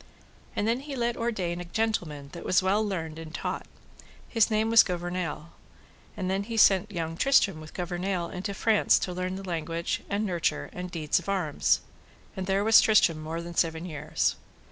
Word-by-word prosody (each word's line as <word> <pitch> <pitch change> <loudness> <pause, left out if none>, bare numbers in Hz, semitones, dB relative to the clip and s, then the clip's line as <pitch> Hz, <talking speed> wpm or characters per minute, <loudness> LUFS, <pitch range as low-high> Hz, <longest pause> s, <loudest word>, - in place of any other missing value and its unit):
And 205 - 0
then 235 +2 +1
he 280 0 -7
let 240 -1 0
ordain 185 -7 -2
a - - -7
gentleman 170 -8 -2
that 170 - -8
was 185 - +2
well 200 +3 +2
learned 165 -6 -4
and 160 -1 -8
taught, - - -4 0.6
his 225 -2 +3
name 220 +1 +1
was 230 - +9
Gouvernail; 175 -3 -3 0.7
and 185 - -2
then 190 +1 0
he 225 +2 -5
sent 195 -1 +5
young 165 -3 -3
Tristram 195 - +3
with 155 - -12
Gouvernail 180 0 -2
into 195 +2 -4
France 220 +1 +4
to 180 - -3
learn 185 +1 -3
the 195 0 -7
language, 165 0 -2
and 205 +2 0
nurture, 175 -4 -1
and 180 0 -5
deeds 160 -4 0
of - - -8
arms. 180 -7 +1 0.5
And 190 -1 -4
there 195 +1 +2
was 225 +1 +7
Tristram 170 -7 +4
more 165 +2 -4
than 170 0 -7
seven 165 0 0
years. 155 -3 -1
180 Hz, 185 wpm, -27 LUFS, 165-210 Hz, 0.7 s, was